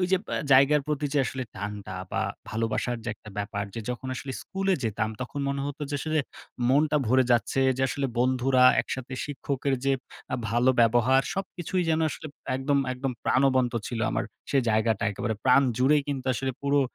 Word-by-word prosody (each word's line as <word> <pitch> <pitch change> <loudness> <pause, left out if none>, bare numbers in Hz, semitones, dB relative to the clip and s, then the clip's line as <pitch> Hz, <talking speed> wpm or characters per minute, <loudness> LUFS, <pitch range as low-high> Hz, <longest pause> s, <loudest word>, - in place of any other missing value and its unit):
যে - - +7 0.4
জায়গার 140 +2 +6
প্রতি 150 -1 -1
যে - - +4
আসলে 130 -1 -4
টানটা 100 -1 -6 0.2
বা 110 0 0 0.3
ভালোবাসার 115 +2 -1
যে - - -3
একটা 105 - -13
ব্যাপার 100 0 -2 0.3
যখন 125 +1 -5
আসলে 135 +1 -5
স্কুলে 195 0 0
যেতাম 110 0 -1
তখন 130 +3 -4
মনে 140 0 -1
হত 145 +1 -6
যে 145 - -1
আসলে 155 0 0 0.5
মনটা 150 +3 +3
ভরে 130 +3 +4
যাচ্ছে। 120 +3 +1 0.2
যে 130 - -1
আসলে 140 0 -1
বন্ধুরা 130 +1 +3 0.2
একসাথে 130 0 -5
শিক্ষকের 140 -1 -2
যে 135 - +3 0.6
ভালো 120 +4 +3
ব্যবহার 120 +3 +4
সবকিছুই 185 -1 -2
যেন 160 0 +2
আসলে 155 - -7 0.3
একদম, 140 +1 +1
একদম 130 +1 -3
প্রাণবন্ত 130 -2 +3
ছিল 120 -2 -4
আমার - - -1 0.3
সেই 135 -2 +3
জায়গাটা 110 0 +1
একেবারে 110 +2 -2
প্রাণ 130 +2 +6 0.2
জুড়ে 135 +4 +5
কিন্তু 135 -2 -3
আসলে 130 +2 -2
পুরো 140 0 +3
130 Hz, 165 wpm, -27 LUFS, 120-140 Hz, 0.6 s, যে